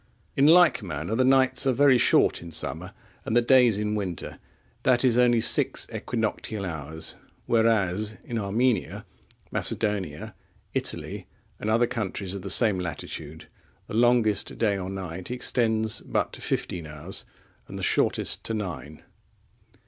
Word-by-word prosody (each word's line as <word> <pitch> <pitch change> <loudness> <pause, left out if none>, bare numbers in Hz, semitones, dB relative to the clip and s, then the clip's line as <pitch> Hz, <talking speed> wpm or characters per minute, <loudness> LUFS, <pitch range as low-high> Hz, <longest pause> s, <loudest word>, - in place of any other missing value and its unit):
In 140 +2 +4
like 165 -6 +6
manner 85 -1 -5
the 130 +3 +2
nights 130 +1 +3
are - - +4
very 135 -1 +4
short - - +3
in 85 - -9
summer, 80 - -4 0.3
and 110 - -2
the 120 - +5
days 125 -4 +5
in 105 0 -2
winter, 95 -5 -5 0.4
that 125 0 +2
is, 120 -3 +4
only 120 -1 +4
six - - +3
equinoctial 110 -2 -3
hours. 80 -1 -6 0.3
Whereas, 110 -2 +1
in 115 -1 -4
Armenia, 110 +1 -1 0.5
Macedonia, 95 -9 0 0.4
Italy, - - -2 0.3
and 105 - -3
other 115 +2 +3
countries 100 -5 -4
of 100 - -5
the 100 - -6
same 105 0 +3
latitude, 80 -2 -7 0.4
the - - -10
longest 115 -2 +2
day 105 -3 +1
or 95 -1 -5
night 95 -2 -6
extends 110 -3 0
but - - -2
to - - -9
fifteen 85 -3 -3
hours, 75 +5 -6 0.4
and - - -8
the - - -6
shortest - - 0
to 115 - -2
nine. 80 - -6
105 Hz, 145 wpm, -26 LUFS, 90-120 Hz, 0.5 s, like